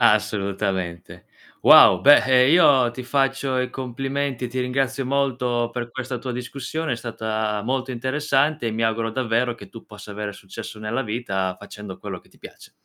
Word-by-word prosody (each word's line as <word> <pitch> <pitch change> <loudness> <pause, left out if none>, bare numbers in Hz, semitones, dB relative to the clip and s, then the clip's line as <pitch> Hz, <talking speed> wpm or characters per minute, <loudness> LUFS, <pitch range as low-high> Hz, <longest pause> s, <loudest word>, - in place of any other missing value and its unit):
Assolutamente. 100 -5 0 0.4
Wow, 90 -2 +8
beh, 145 +1 +8
eh, 130 0 +5
io 135 -8 +5
ti 125 +2 -8
faccio 135 0 0
i 125 0 -1
complimenti, 135 +1 -3
e - - -2
ti 130 +2 -3
ringrazio 130 +1 -1
molto 125 -3 0
per 120 -1 -5
questa 130 0 -5
tua 125 +1 -5
discussione, 135 +5 -4
è - - -1
stata 110 -2 -3
molto 130 +2 -2
interessante, 140 +3 0
e - - 0
mi 115 +1 -1
auguro 115 0 0
davvero 120 0 0
che - - -13
tu 115 - -12
possa 105 -1 -12
avere 105 0 -5
successo 100 +2 -9
nella 110 +5 -2
vita, 100 -5 -3
facendo 105 -2 -10
quello - - -7
che - - -26
ti - - -25
piace. - - -13
120 Hz, 175 wpm, -23 LUFS, 110-130 Hz, 0.4 s, Wow